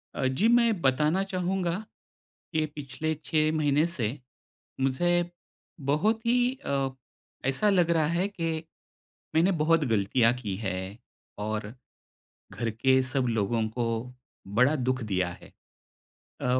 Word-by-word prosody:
अ, - - -1
जी, 130 +13 +2
मैं 235 -5 +4
बताना 150 +7 +2
चाहूँगा 185 0 -2 0.7
कि 155 -1 +1
पिछले 150 +2 -3
6 155 -1 +2
महीने 150 +1 +3
से 125 -11 -2 0.7
मुझे 175 +7 +1 0.6
बहुत 215 +10 +1
ही 245 +2 +3
अ, 135 -1 0 0.6
ऐसा 205 +10 +2
लग 175 -4 +3
रहा 160 -2 +3
है 190 +3 +1
कि 165 -5 -3 0.9
मैंने 170 +4 +4
बहुत 165 0 +4
गलतियाँ 115 +1 +3
की 110 -6 -4
है, 95 -3 -2 0.6
और 105 +1 -3 0.8
घर 115 -2 -2
के 130 +4 +3
सब 130 0 0
लोगों 110 0 0
को 115 +2 -2 0.7
बड़ा 125 +7 +4
दुख 130 -1 -1
दिया 95 -4 0
है। - - -15 0.9
अ - - -3
145 Hz, 125 wpm, -28 LUFS, 120-175 Hz, 0.9 s, मैं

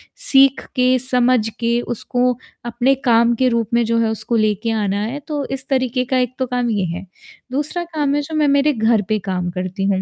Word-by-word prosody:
सीख 270 -1 +3
के 255 0 +3
समझ 250 -2 +2
के 235 0 +1
उसको 250 +2 0 0.3
अपने 240 +3 +1
काम 235 0 +4
के 255 +2 +2
रूप 230 -2 0
में 235 0 +3
जो 230 +1 0
है 225 - +1
उसको 220 +2 -2
लेके 215 +1 +1
आना 205 -2 -1
है, 245 +7 -4
तो 290 -1 -4
इस 270 0 -5
तरीक़े 255 -2 0
का 260 +1 0
एक 250 -1 0
तो 260 - +1
काम 245 -1 -1
ये 205 -4 0
है। - - -7 0.5
दूसरा 295 +6 -2
काम 290 -2 0
है 290 - +1
जो 310 +2 -6
मैं 300 -1 +3
मेरे 280 +1 +3
घर 220 -2 +2
पे 215 -1 +1
काम 180 -1 -1
करती 185 +2 -3
हूँ। 195 -1 +1
240 Hz, 215 wpm, -19 LUFS, 220-270 Hz, 0.5 s, काम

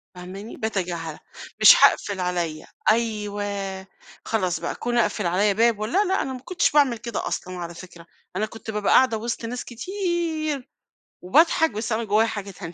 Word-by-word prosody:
فاهماني؟ 190 +5 -9
باتجاهلها. 175 -7 -3 0.4
مش - - +10
هاقفل 200 -2 +4
عليَّ، 175 -4 -2 0.3
أيوه 205 -3 -2 0.4
خلاص 185 -6 0
بقى - - -4
كون 240 0 -2
اقفل 210 -4 +1
عليَّ 200 +4 +2
باب 225 +1 +2
و 215 - -1
لا، 375 - +2
لأ 380 +1 +1
أنا 265 - -3
ما 255 - -7
كنتش 350 +7 0
باعمل 280 -5 +3
كده 230 0 -4
أصلًا 185 0 -4
على 170 -1 -6
فكرة، 175 -1 -12 0.3
أنا 210 +3 0
كنت 225 +1 -8
بابقى 210 -1 +1
قاعدة 255 -3 +5
وِسط 230 +1 -4
ناس 245 +2 -5
كتير، 320 - -3 0.5
وباضحك 320 - +4
بس 220 +2 -4
أنا 220 +1 +1
من 225 - -5
جوايا 215 +3 +3
حاجة 205 -3 -5
تانية، 175 -3 -9
215 Hz, 175 wpm, -24 LUFS, 190-240 Hz, 0.5 s, مش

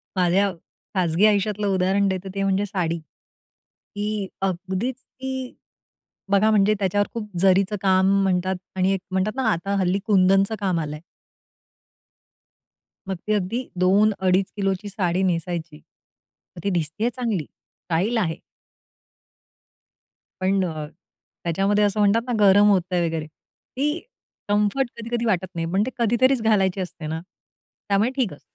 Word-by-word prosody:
माझ्या 190 +2 +3 0.4
खाजगी 180 +1 +3
आयुष्यातलं 210 0 +2
उदाहरण 195 +1 +2
देतो 190 0 -3
ते 195 - 0
म्हणजे 195 +1 +1
साडी. 175 -5 -2 1.0
की 205 -1 -2
अगदीच 190 +6 -2
ती, 260 -1 -6 0.8
बघा 200 +2 +4
म्हणजे 210 0 +4
त्याच्यावर 205 +1 +1
खूप 220 -2 -5
जरीचं 195 +2 +3
काम 190 -1 +3
म्हणतात 185 0 +1 0.2
आणि 190 0 +2
एक 195 - -1
म्हणतात 190 +4 0
ना 265 - -1
आता 195 +2 -1
हल्ली 185 +1 +1
कुंदनचं 195 0 +3
काम 185 -4 0
आलंय. 150 -1 -4 2.1
मग 190 - -1
ती 215 - +2
अगदी 210 +5 -1
2 200 +4 +4 0.2
अडीच 185 +1 +3
किलोची 195 0 -1
साडी 185 -2 0
नेसायची. 170 -3 -2 0.8
मग 175 - -10
ती 200 - +1
दिसतेय 175 +6 -1
चांगली, 230 - -2 0.4
स्टाईल 185 +8 0
आहे. 170 -7 0 2.0
पण 190 +1 +2
अ, 155 -3 -4 0.6
त्याच्यामध्ये 195 +5 +1
असं 205 0 +1
म्हणतात 205 +2 +4
ना 245 - -1
गरम 205 0 +6
होतंय 180 -3 +2
वगैरे 160 -1 -3
ती 290 - -5 0.5
कम्फर्ट 210 +6 +1
कधी-कधी 235 +1 -2
वाटत 185 -4 +1
नाही. 165 0 -2
पण 195 +2 +3
ते 260 - -4
कधीतरीच 240 +3 +3
घालायची 195 -4 +2
असते 170 -3 -6
ना 160 +1 -3 0.7
त्यामुळे 200 +4 +3
ठीक 250 - 0
असतं. 145 - -14
195 Hz, 135 wpm, -23 LUFS, 185-210 Hz, 2.1 s, गरम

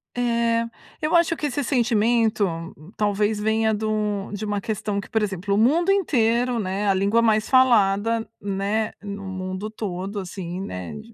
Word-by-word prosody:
É. 235 -1 +1 0.4
Eu 310 +2 +1
acho 335 -1 +3
que - - -3
esse 285 0 -1
sentimento, 230 -3 +2 0.5
talvez 210 0 +1
venha 220 +1 +1
de 215 +1 -2
um 210 -2 -1
de 205 +1 -4
uma 205 -1 -1
questão 205 -1 -2
que, - - -8
por 220 - +1
exemplo, 200 -1 -2
o - - +2
mundo 315 - +3
inteiro, 245 - +2
né, 200 +1 -2
a 195 - +4
língua 200 +4 +2
mais 220 -1 +2
falada, 225 -3 +3
né, 200 +2 -1
no 200 -1 -6
mundo 185 +2 -4
todo, 200 -1 -4
assim, 180 -1 -6
né, 90 - -6
de 75 - -11
215 Hz, 165 wpm, -23 LUFS, 200-230 Hz, 0.5 s, a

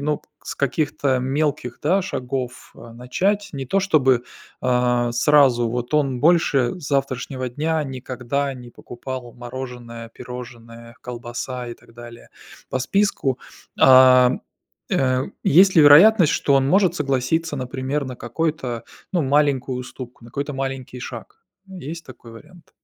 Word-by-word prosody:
ну, 150 +1 -2 0.2
с - - -7
каких-то 140 -2 0
мелких, 135 -2 -2
да, 185 +6 +2
шагов, 125 -7 -5
а, 115 0 -13
начать? 195 - -1
Не 135 -2 -5
то 195 - +1
чтобы, 135 -10 +2 0.4
а, 125 -1 +1
сразу, 125 -2 +4
вот 125 +4 -3
он 135 -4 +1
больше 160 -2 +2
с 145 - -7
завтрашнего 130 -2 -2
дня 155 +5 -1
никогда 130 +1 -3
не 125 -1 -11
покупал 120 0 -8
мороженое, 120 -2 -8
пирожное, 115 -1 -11
колбаса 120 +1 -6
и 120 - -6
так 115 - -22
далее, 120 0 -12 0.4
по 130 - -1
списку. 140 -6 0 0.4
А, 130 -1 +7 0.6
э, 130 0 +1 0.2
есть 185 +5 +5
ли 160 - +7
вероятность, 165 +5 +7
что 140 - +1
он 135 -1 +3
может 190 +1 +3
согласиться, 145 +3 -1
например, 130 +3 -3
на 130 -1 -6
какой-то, 125 -2 -3 0.3
ну, 180 - +1
маленькую 135 -2 +1
уступку, 125 -1 -9
на 120 - -13
какой-то 145 +3 -4
маленький 135 -2 -5
шаг? 420 - -9 0.2
Есть 170 -3 -8
такой 120 -2 -13
вариант? 170 +9 -16
130 Hz, 135 wpm, -21 LUFS, 125-150 Hz, 0.6 s, А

